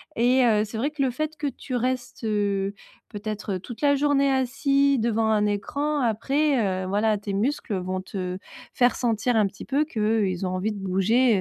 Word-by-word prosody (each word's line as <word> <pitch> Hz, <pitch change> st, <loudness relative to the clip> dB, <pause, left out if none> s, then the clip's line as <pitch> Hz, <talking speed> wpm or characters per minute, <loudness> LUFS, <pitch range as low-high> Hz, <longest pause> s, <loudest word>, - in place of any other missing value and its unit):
et 250 Hz, +2 st, +4 dB
heu, 215 Hz, -2 st, +3 dB
c'est 220 Hz, +1 st, -6 dB
vrai 280 Hz, +6 st, 0 dB
que 300 Hz, -2 st, -4 dB
le 265 Hz, -, +3 dB
fait 310 Hz, +5 st, -3 dB
que 295 Hz, -2 st, -3 dB
tu 265 Hz, -1 st, -5 dB
restes, 245 Hz, 0 st, -2 dB
heu, 200 Hz, -2 st, 0 dB, 0.4 s
peut-être, 210 Hz, -1 st, -4 dB
heu, 185 Hz, -, -3 dB
toute 240 Hz, +7 st, -10 dB
la 285 Hz, -1 st, +4 dB
journée 280 Hz, -1 st, +2 dB
assis 275 Hz, +2 st, +2 dB
devant 225 Hz, -1 st, +1 dB
un 210 Hz, -1 st, +3 dB
écran, 285 Hz, +9 st, -1 dB
après, 235 Hz, -4 st, +1 dB
heu, 185 Hz, -, -4 dB
voilà, 210 Hz, +2 st, +1 dB
tes 200 Hz, 0 st, -5 dB
muscles, 225 Hz, +2 st, -1 dB
heu, 190 Hz, -, 0 dB
vont 185 Hz, +1 st, -3 dB
te 185 Hz, -1 st, -4 dB, 0.4 s
faire 245 Hz, 0 st, +3 dB
sentir 235 Hz, 0 st, 0 dB
un 215 Hz, -2 st, +4 dB
petit 195 Hz, +1 st, -6 dB
peu 280 Hz, +2 st, +1 dB
qu'ils 210 Hz, -, 0 dB
ont 180 Hz, -, -1 dB
envie 200 Hz, +4 st, -1 dB
de 205 Hz, -, -6 dB
bouger, 200 Hz, +5 st, +2 dB
225 Hz, 200 wpm, -25 LUFS, 200-265 Hz, 0.4 s, et